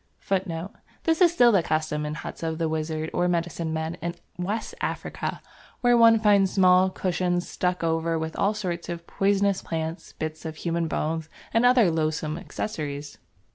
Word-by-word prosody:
This 325 +1 +1
is 350 -2 +7
still 245 -8 +5
the 195 -5 +4
custom 155 -2 -1
in 150 - -3
the - - -6
huts - - -7
of 160 -1 -2
the 165 -1 0
wizard 155 0 -2
or 175 0 +2
medicine 170 -1 -1
man 160 +1 -3
in 170 +1 -3 0.2
West 205 +5 -3
Africa, - - -3 0.4
where 245 -1 +5
one 230 -1 +7
finds 205 -3 +4
small 185 -1 +5
cushions 180 -1 -1
stuck 180 -1 -1
over 165 0 +1
with 160 0 -4
all 205 +2 +1
sorts 175 -5 -4
of 170 -1 -5
poisonous 200 0 +1
plants, 160 +1 -4
bits 155 0 -5
of 160 -1 -5
human 170 0 -1
bones, 160 0 -2 0.2
and 230 +2 +5
other 245 -8 +5
loathsome 155 0 -1
accessories. 145 -8 -5
170 Hz, 170 wpm, -26 LUFS, 160-195 Hz, 0.4 s, is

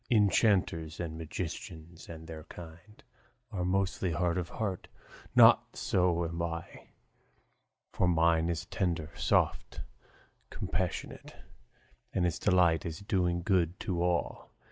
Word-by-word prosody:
Enchanters 100 -7 +2
and 85 -2 -4
magicians 80 +1 -7
and 80 -1 -9
their 80 -1 -8
kind 85 +5 -12 0.5
Are 95 -4 -2
mostly 95 -1 0
hard 85 +1 0
of 90 -1 -2
heart; 100 -5 -4 0.5
not - - +6
so 90 -2 +1
am 85 +1 -4
I; 85 0 -5 1.1
For 90 - +2
mine 85 -1 +3
is 85 0 -2
tender, 85 -5 -2
soft, - - 0 0.7
compassionate, - - -4 0.8
And 90 - +1
its 85 -2 -1
delight 85 -4 +3
is 85 +3 -6
doing 90 -4 0
good 90 -2 +1
to 95 -6 -2
all. 90 -1 -1
85 Hz, 120 wpm, -31 LUFS, 80-90 Hz, 1.1 s, not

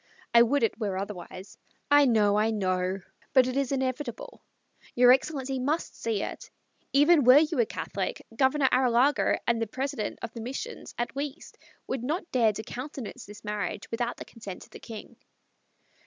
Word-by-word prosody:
I 235 - +8
would 245 +3 +3
it 225 - 0
were 200 -4 -2
otherwise. 190 -1 -7 0.3
I 290 0 +7
know 210 -4 +3
I 215 +1 +3
know 185 -2 -1 0.3
but 260 -2 +6
it 255 0 -3
is 275 -1 0
inevitable. 275 - -3 0.5
Your 245 0 +7
excellency 270 -1 -1
must 295 +6 -1
see 225 -3 -2
it. - - -7 0.4
Even 295 +2 +5
were 255 +3 +8
you 310 -2 +2
a 230 - +3
Catholic, - - -4
Governor 265 +2 +3
Arrillaga 255 +2 +3
and 230 -1 +1
the 225 - 0
President 260 -1 -3
of 230 - -5
the 230 - -7
Missions, 270 - -6
at 240 0 -3
least, 285 +2 -6 0.3
would 260 -2 -3
not 330 +7 -3
dare 230 -4 +4
to 215 +1 -6
countenance 255 -2 -7
this 205 +1 -12
marriage 205 -2 -4
without 240 +1 -2
the - - -8
consent 200 -5 -9
of - - -19
the - - -10
King." 225 -3 -10
245 Hz, 170 wpm, -28 LUFS, 215-275 Hz, 0.5 s, I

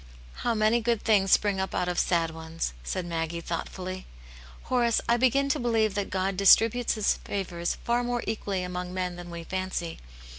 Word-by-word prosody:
"How 235 - 0
many 215 +2 +3
good 230 -1 0
things 195 -3 +3
spring 205 -2 +3
up 190 0 -2
out 180 - 0
of 180 -1 0
sad 165 -2 +1
ones 160 - -4
!" - - -20
said 180 - -3
Maggie, 165 0 -3
thoughtfully. 185 +2 -5 0.3
" 60 0 -18
Horace, 240 -3 +2
I 235 - +4
begin 260 +3 +3
to - - +1
believe 225 -3 +1
that 205 0 -2
God 190 +1 -1
distributes 225 +5 +5
His 215 -2 +1
favours 175 -3 -3
far 240 +1 +1
more 240 0 -1
equally 200 -4 -2
among 180 0 -5
men 180 -1 -2
than 175 0 -9
we 170 -1 -7
fancy. 185 -2 -3
190 Hz, 190 wpm, -27 LUFS, 175-225 Hz, 0.3 s, distributes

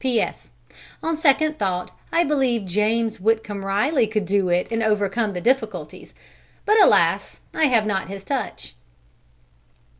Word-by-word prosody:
P.S. 250 -4 -1 0.5
On 325 0 0
second 310 0 +2
thought 180 -2 -2 0.2
I 340 - +3
believe 265 - 0
James 215 +4 0
Whitcomb 210 -1 -1
Riley 225 +6 +1
could 215 -2 -2
do 195 0 +1
it 175 +1 +1
and 225 0 -1
overcome 210 0 0
the 180 - -5
difficulties, 260 +7 -2 0.5
but 425 +1 +4
alas! - - +3
I 315 - +2
have 235 -6 +3
not 195 -3 -2
his 195 0 -8
touch! 225 - -4
220 Hz, 140 wpm, -22 LUFS, 195-265 Hz, 0.5 s, but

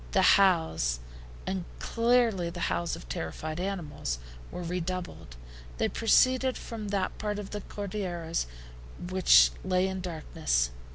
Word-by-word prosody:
The - - +4
howls, 160 - +3 0.5
and 190 -1 -2
clearly 230 -6 +2
the 175 0 -7
howls 170 -1 -1
of - - -11
terrified 80 - -4
animals, 175 - -3 0.3
were 180 - -6
redoubled. 180 - -4 0.4
They - - +1
proceeded 255 +3 +3
from 220 -3 -6
that 200 -2 -1
part 210 -1 -2
of 205 -2 -6
the 210 - -4
Cordilleras 180 - -3 0.6
which 185 -1 +6
lay 185 0 +2
in 190 -1 -3
darkness. 155 - -1
185 Hz, 125 wpm, -29 LUFS, 165-205 Hz, 0.6 s, which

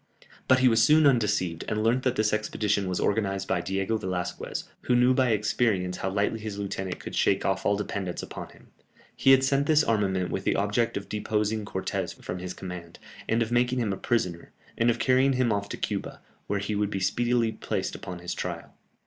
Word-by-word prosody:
But 130 - +6
he 130 - +6
was 115 -2 +4
soon 150 +4 +5
undeceived, 105 - +2
and 105 0 -1
learnt 120 +3 +2
that 130 -1 +2
this 110 -1 +1
expedition 105 -2 0
was 90 - -1
organized 100 -2 0
by - - 0
Diego 95 +3 -1
Velasquez, 90 -3 -4 0.2
who 125 - +3
knew 125 +1 +5
by 130 -1 +2
experience 105 -4 +1
how 95 - -2
lightly 100 +3 0
his 105 -2 -5
lieutenant 95 -2 -4
could - - -7
shake - - +2
off - - 0
all 100 - +3
dependence 100 -3 -4
upon - - -7
him; - - -19 0.5
he - - +2
had 135 0 +7
sent 140 +1 +2
this 155 -1 +5
armament 95 -6 0
with - - -2
the - - +1
object 105 +4 0
of 100 - -6
deposing 105 0 -1
Cortès 95 -1 -3
from 90 - -5
his 90 0 -6
command, 90 -3 -8 0.3
of 115 0 +1
making 125 +1 +2
him 110 -5 0
a - - -2
prisoner, 90 -6 -2 0.2
and 115 +1 +2
of 120 - +2
carrying 130 +1 +3
him 125 -3 +2
off 100 0 -2
to - - -5
Cuba, - - -3 0.3
where 100 - 0
he 100 +2 -2
would 105 -1 0
be 100 - -3
speedily 120 +4 +1
placed - - -3
upon 90 -1 -7
his 90 0 -5
trial. - - -5
105 Hz, 205 wpm, -27 LUFS, 95-120 Hz, 0.5 s, had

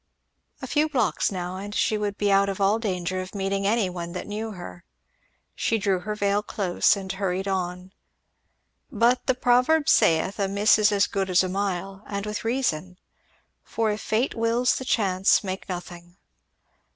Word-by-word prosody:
A - - -1
few 300 +4 +1
blocks 245 -8 0
now 180 -1 -4
and 205 +2 -7
she 215 - +1
would 205 -1 -2
be 205 -1 +1
out 195 0 +4
of 195 - -4
all 200 +3 +2
danger 185 -3 -2
of 185 +2 -9
meeting 195 0 -1
any 220 -1 +2
one 175 -1 -6
that 180 - -5
knew 215 +1 -5
her. 175 -1 -10 0.7
She 225 - 0
drew 195 -3 0
her 210 +3 -4
veil 200 0 +1
close 195 -3 +1
and 190 -1 -5
hurried 190 0 -2
on. 180 -1 -3 1.0
But 240 +1 +2
the 260 - +3
proverb 255 +5 +3
saith 165 +5 +3
"a 200 - +1
miss 205 +2 +3
is 215 0 +4
as 200 -1 +3
good 195 -1 -2
as 185 +1 +4
a 185 - -2
mile," 195 0 -3
and 200 0 -4
with 210 0 -4
reason; 190 -8 -1 0.7
for 225 -1 -1
if 210 - -4
fate 225 +5 0
wills 230 +2 +1
the 260 - -6
chances 195 -5 +2
make 190 0 -5
nothing. 175 -1 -8
200 Hz, 175 wpm, -25 LUFS, 185-220 Hz, 1.0 s, out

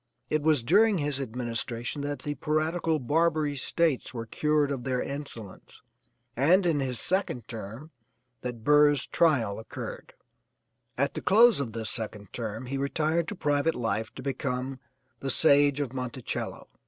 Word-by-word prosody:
It 155 - +1
was 150 -5 +3
during 210 - +4
his 145 -3 -1
administration 120 +1 -3
that 145 0 -4
the 145 - -2
piratical 155 +3 0
Barbary 155 +1 +1
States 140 -2 0
were 115 -1 -4
cured 150 +4 +1
of 130 -3 -3
their 130 -1 -1
insolence, 140 -9 -7 0.5
and 175 +9 +4
in 160 -4 +2
his 130 -3 -2
second 170 - -1
term 115 +7 -8 0.5
that 120 -3 -6
Burr's 145 0 +5
trial 120 -12 +2
occurred. 110 - -8 0.8
At 140 +2 +1
the - - -5
close 225 -2 +6
of 125 -6 -3
this 110 -1 -2
second 105 -3 -4
term 115 +1 -4
he 135 +2 -3
retired 155 +4 0
to 210 - -4
private 150 -1 +1
life 110 -2 -2
to 130 - -8
become 130 -1 -3 0.4
the 135 - -3
'Sage 145 0 +5
of 135 -4 -2
Monticello.' 125 -1 -4
140 Hz, 150 wpm, -28 LUFS, 120-155 Hz, 0.8 s, close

